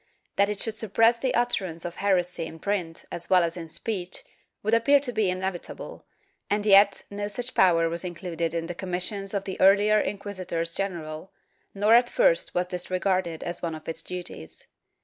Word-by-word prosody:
That 200 +1 +3
it 210 -1 -3
should 220 -1 -3
suppress 225 +2 +3
the 260 +1 0
utterance 190 -9 -1
of 175 - -6
heresy 180 -4 0
in 165 - -10
print 175 -2 -3
as 170 - -5
well 180 -2 +5
as 165 0 -2
in 165 -2 -7
speech 185 0 -4 0.4
would 215 +2 0
appear 255 +5 +5
to 270 -3 -2
be 215 -4 +1
inevitable, 185 -1 -5 0.4
and 205 +1 0
yet 200 0 +6
no 205 0 -3
such 245 +4 -1
power 165 -3 +4
was 170 +1 -3
included 170 -2 -3
in 165 0 -1
the 175 - -5
commissions 190 +2 -3
of 195 - -1
the 190 - -5
earlier 205 +2 +5
inquisitors 185 -5 -3
general, 170 -3 -4 0.4
nor 205 +3 +3
at 240 +1 +6
first - - +2
was 180 0 +2
this 180 0 -5
regarded 185 -3 0
as 175 0 -5
one 165 -2 -3
of 155 - -12
its 165 0 -3
duties. 175 - -8
185 Hz, 185 wpm, -26 LUFS, 170-205 Hz, 0.4 s, yet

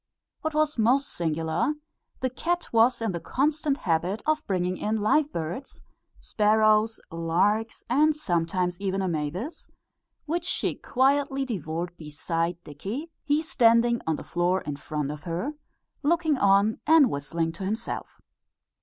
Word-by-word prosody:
What 315 -1 -3
was 305 -4 +1
most 260 +6 +3
singular, 165 - -1 0.5
the 260 -1 0
cat 345 +5 -2
was 230 +1 +4
in 225 - 0
the 170 - -3
constant 290 - 0
habit 175 - -1
of 310 0 +1
bringing 185 -2 0
in 215 +1 -1
live 285 +8 +2
birds, 170 - -5 0.4
sparrows, 215 +1 +3
larks, 185 +7 0
and 300 +5 +3
sometimes 180 - -1
even 195 -1 -1
a - - 0
mavis, 170 - -4 0.6
which 340 +3 -2
she 375 - 0
quietly 275 +1 +1
devoured 175 - -4
beside 165 +2 -2
Dickie, 210 - -6
he 300 +2 +1
standing 235 -4 +3
on 160 - +2
the - - -7
floor 175 +2 0
in 145 - -4
front 150 -1 -3
of 150 -1 -7
her, 180 - -2 0.5
looking 320 0 +2
on 200 -1 +3
and 310 -5 +6
whistling 165 +4 -2
to 190 - -8
himself. 210 +4 -4
215 Hz, 140 wpm, -26 LUFS, 170-275 Hz, 0.6 s, and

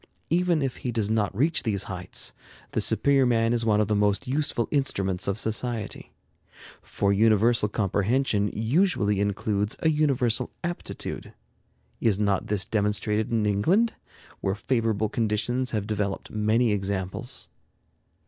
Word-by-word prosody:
Even 170 -3 +2
if 135 -2 -2
he 125 - -3
does 110 -2 -1
not 105 -3 0
reach 155 +6 +2
these 100 -4 0
heights, 90 -1 -3 0.4
the - - 0
superior 140 -2 +3
man 115 -1 +2
is 120 -1 0
one 105 -1 +3
of 105 - +2
the 105 - +1
most 105 +4 +1
useful 135 -3 0
instruments 100 -10 0
of 100 +1 0
society. 110 -1 -3 0.7
For 100 0 0
universal 110 +1 +3
comprehension 105 +2 +1
usually 110 - +1
includes 100 +1 0
a 160 - +1
universal 130 -5 +1
aptitude. 175 0 -5 0.6
Is 110 -4 +2
not 100 -2 0
this 100 -2 -1
demonstrated 105 0 0
in 115 -2 +1
England, 170 - +2 0.5
where 95 0 -1
favorable 110 -2 0
conditions 115 +3 -1
have 105 -3 -2
developed 105 -2 -3
many 110 +2 +2
examples? 95 -2 -3
110 Hz, 135 wpm, -26 LUFS, 100-125 Hz, 0.7 s, superior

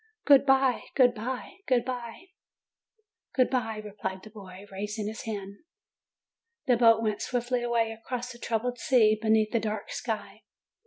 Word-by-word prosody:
"Good 280 -1 +6
bye! 265 -2 +3
Good 250 -3 +5
bye! 250 - -5
Good 250 -3 +2
bye 250 +8 -6 0.5
!" 440 0 -34
"Good 255 -2 +3
bye!" 225 -4 -1
replied 190 -2 -5
the 215 - -12
boy, 195 -2 -11
raising 210 +2 -4
his 215 +1 -6
hand. 200 -2 -5 1.1
The 250 -4 +4
boat 230 -1 +5
went 215 -2 -1
swiftly 245 0 -1
away 235 -2 +1
across 245 +2 -5
the 240 - -12
troubled 240 +2 -2
sea, 215 -5 +4
beneath 220 -1 +3
the 230 - +2
dark 215 -1 -4
sky. - - -5
230 Hz, 155 wpm, -28 LUFS, 215-250 Hz, 1.1 s, Good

